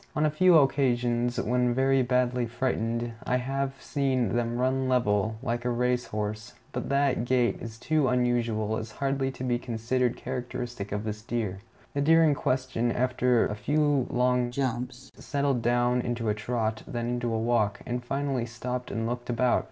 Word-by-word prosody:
On 150 - +2
a 155 - +2
few 180 +2 +6
occasions, 120 -4 +2
when 125 +1 +1
very 135 0 +3
badly 125 -1 +1
frightened, 120 -1 -1
I 125 - +1
have 135 +1 -2
seen 130 -7 0
them 120 0 0
run 130 +1 +1
level, 110 -4 +2
like 120 -1 -2
a 125 - 0
race 125 +1 +1
horse; 105 +2 -4 0.2
but - - -4
that 140 -3 +2
gait 120 -1 +1
is 115 -1 -8
so 155 +1 +1
unusual 120 -3 +1
as 110 -1 -6
hardly 135 +1 -1
to 130 - -7
be 120 -1 0
considered 120 +1 -1
characteristic 120 -4 -5
of 105 +1 -2
this 105 -1 -4
deer. 110 -5 -3 0.3
The 140 - 0
deer 165 +3 +5
in 155 -2 +4
question, 130 -3 0
after 125 -1 +2
a - - -2
few 145 +3 +1
long 125 0 +2
jumps, 125 0 -3
settled 140 -3 0
down 120 +1 +2
into 120 -2 -2
a - - +3
trot, 110 0 -2
then 120 -1 -3
into 120 -1 -1
a 115 - 0
walk, 110 -3 +1
and 120 0 -3
finally 135 -1 -1
stopped 125 +2 -4
and 115 +2 -2
looked 120 +1 -4
about. 120 +1 +2
125 Hz, 175 wpm, -28 LUFS, 115-130 Hz, 0.3 s, few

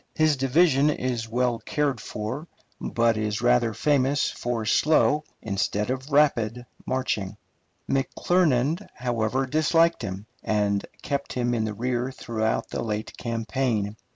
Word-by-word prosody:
His 155 -1 +3
division 140 +2 +3
is 125 -5 -2
well 120 0 +1
cared 140 0 -1
for, 115 +12 -5 0.3
but 115 -1 +1
is 110 +1 -2
rather 120 -1 +4
famous 140 +4 +1
for 120 -2 -3
slow 150 +5 +3 0.2
instead 105 +2 -1
of 130 +2 -4
rapid 125 -5 +2 0.2
marching. 125 -7 -1 0.5
McClernand, 155 +3 +1
however, 120 +1 0
disliked 165 +4 +3
him, 95 -1 -5 0.2
and 105 -2 +1 0.2
kept 140 -1 -2
him 120 -1 0
in 110 -2 0
the 105 -1 -4
rear 125 +3 -1
throughout 110 -3 -2
the - - -3
late 110 -1 -3
campaign. 115 -2 -1
125 Hz, 125 wpm, -25 LUFS, 110-140 Hz, 0.5 s, rather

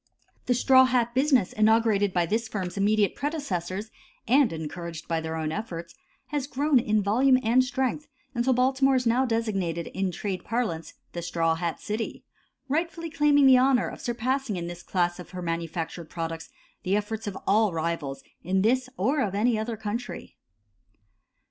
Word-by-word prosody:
The 245 - +3
straw 260 +1 +6
hat 245 -2 +1
business 260 -6 +2
inaugurated 215 -2 +3
by 175 -1 +1
this 220 +6 -1
firm's 190 -5 -4
immediate 205 +1 +2
predecessors, 215 - -3 0.4
and 260 +1 +4
encouraged 165 +1 -6
by 165 -1 -1
their 160 0 -4
own 155 -1 -2
efforts, 170 -4 -5 0.4
has 290 -2 -2
grown 285 0 +2
in 215 -2 +1
volume 255 +6 +4
and 240 +3 +4
strength 265 +3 -2 0.3
until 240 +1 +1
Baltimore 265 +2 +3
is 250 -1 +1
now 240 +3 +3
designated 195 -8 -1
in 195 0 -1
trade 190 0 -4
parlance 215 -9 -3 0.2
"the 175 - -5
straw 165 -1 0
hat 165 0 -3
city," 215 +2 -4 0.4
rightfully 330 +3 -2
claiming 290 -2 +4
the 260 -1 +7
honor 255 -1 +3
of - - -10
surpassing 245 0 -1
in 175 -1 -4
this 175 0 -7
class 175 0 -1
of 180 - -9
her - - -4
manufactured 165 -1 -4
products 165 -1 -5 0.3
the 190 +2 0
efforts 215 +1 -3
of 195 - -4
all 210 +1 +3
rivals 160 -4 -3 0.2
of 190 +2 +1
this 255 +3 +2
or 265 +10 +1
of 200 -6 -1
any 220 +2 +2
other 220 +1 -3
country. 220 +3 -5
215 Hz, 165 wpm, -26 LUFS, 175-255 Hz, 0.4 s, the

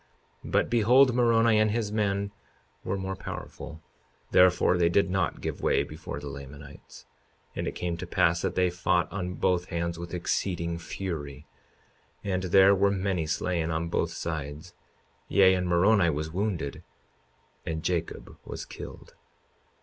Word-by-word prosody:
But - - +1
behold, 125 +3 +5
Moroni 115 -2 +4
and 110 0 +3
his 110 -1 -1
men 100 -2 0 0.5
were 95 +2 -2
more 95 0 -4
powerful; 80 -4 -8 0.5
therefore 90 0 +5
they 85 -1 +3
did 95 +1 +2
not 95 -3 -1
give - - -4
way - - +2
before - - -7
the 75 - -8
Lamanites. 70 +1 -11 0.5
52:35 - - -17
And - - -2
it - - -4
came 85 -1 -3
to 90 +1 -6
pass 85 0 +2
that - - -2
they 90 -1 +2
fought 90 0 0
on 90 -2 -4
both 90 -1 +1
hands 85 -1 -3
with 85 +1 -6
exceeding 85 -1 -2
fury; 75 -6 -6 0.8
and 95 -2 -1
there 95 +2 +6
were 100 +1 +3
many 95 -4 -1
slain 85 +1 -1
on 80 +1 -2
both - - 0
sides; 80 +1 -5 0.5
yea, 95 -1 +5
and 90 -1 0
Moroni 90 +1 +4
was 75 0 -2
wounded 90 -7 -2 0.8
and 80 -1 -4
Jacob 85 -1 -3
was - - -7
killed. - - -10
90 Hz, 150 wpm, -28 LUFS, 85-100 Hz, 0.8 s, there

